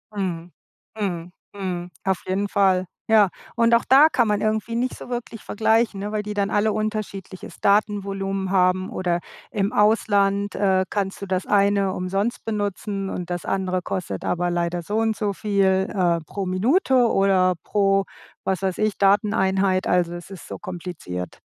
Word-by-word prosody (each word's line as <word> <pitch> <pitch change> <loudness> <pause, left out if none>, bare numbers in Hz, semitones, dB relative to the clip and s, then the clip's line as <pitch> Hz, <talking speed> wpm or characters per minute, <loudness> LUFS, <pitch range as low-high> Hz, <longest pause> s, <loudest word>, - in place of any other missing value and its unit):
Mhm, 175 -3 -3 0.5
mhm, 175 -4 -3 0.2
mhm, 180 -3 -4
auf 190 -1 0
jeden 195 +2 -1
Fall, 190 -2 +2 0.2
ja. 215 -3 +6 0.3
Und 230 0 +3
auch 235 - +2
da 275 +4 +8
kann 240 -7 +2
man 210 -1 +1
irgendwie 215 +1 -1
nicht 250 +2 -1
so - - -10
wirklich 240 -2 -5
vergleichen, 220 -1 +1
ne, 205 +1 -4
weil 210 -1 -1
die 210 0 -5
dann 200 -1 0
alle 215 +1 +2
unterschiedliches 210 -3 -5
Datenvolumen 195 -2 0
haben 185 0 +2
oder 180 -6 -1 0.3
im 200 -1 -1
Ausland, 205 -2 +2
äh, 190 -1 +2
kannst 195 -2 -2
du - - -3
das 185 -1 -1
eine 200 -1 +3
umsonst 195 +5 -2
benutzen 205 -2 -3
und 180 -2 -5
das 175 -1 -3
andere 185 -1 -1
kostet 170 - -4
aber 175 0 0
leider 175 0 -1
so 205 +6 -3
und 225 -1 +1
so 205 -1 -1
viel, 195 -1 +1
äh, 175 -4 +2
pro 195 +5 -4
Minute 245 - +2 0.2
oder 190 -2 +3
pro, 195 -1 +2 0.4
was 190 -1 0
weiß 190 -2 -1
ich, 215 -1 0
Dateneinheit, 195 -2 +2
also 175 -1 +2
es 175 0 -8
ist 195 -3 -10
so - - -6
kompliziert. 170 - -6
195 Hz, 165 wpm, -23 LUFS, 185-210 Hz, 0.5 s, da